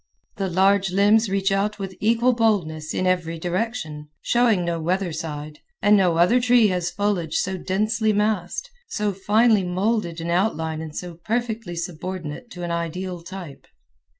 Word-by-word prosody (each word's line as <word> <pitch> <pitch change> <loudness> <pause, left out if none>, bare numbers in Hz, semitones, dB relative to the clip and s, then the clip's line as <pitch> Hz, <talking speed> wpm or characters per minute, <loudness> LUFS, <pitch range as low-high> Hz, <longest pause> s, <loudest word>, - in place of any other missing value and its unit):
The 195 -2 -1
large 195 +2 +3
limbs 205 +3 +4
reach 195 0 +1
out 200 +2 0
with 195 -2 -6
equal 235 +3 +3
boldness 180 -10 0
a 185 - 0
every 175 -3 0
direction, 175 -4 -3
showing 230 -7 +3
no 170 -1 -1
weather 180 +1 -1
side, 150 -2 -6 0.2
and 205 +1 +5
no 180 -4 +3
other 205 +9 +4
tree 240 -3 +5
has 180 -2 -1
foliage 195 -6 -1
so 190 +1 0
densely 215 +4 0
massed, 210 - -1 0.2
so 210 -1 -1
finely 210 +2 +3
molded 185 -1 -1
in 170 +1 -3
outline 160 -4 0
and 155 -1 -8
so 180 -1 -5
perfectly 225 -5 -2
subordinate 170 +2 -5
to 180 -6 -8
an 170 - -3
ideal 170 +2 -3
type. 175 -4 -9
190 Hz, 155 wpm, -23 LUFS, 170-215 Hz, 0.2 s, and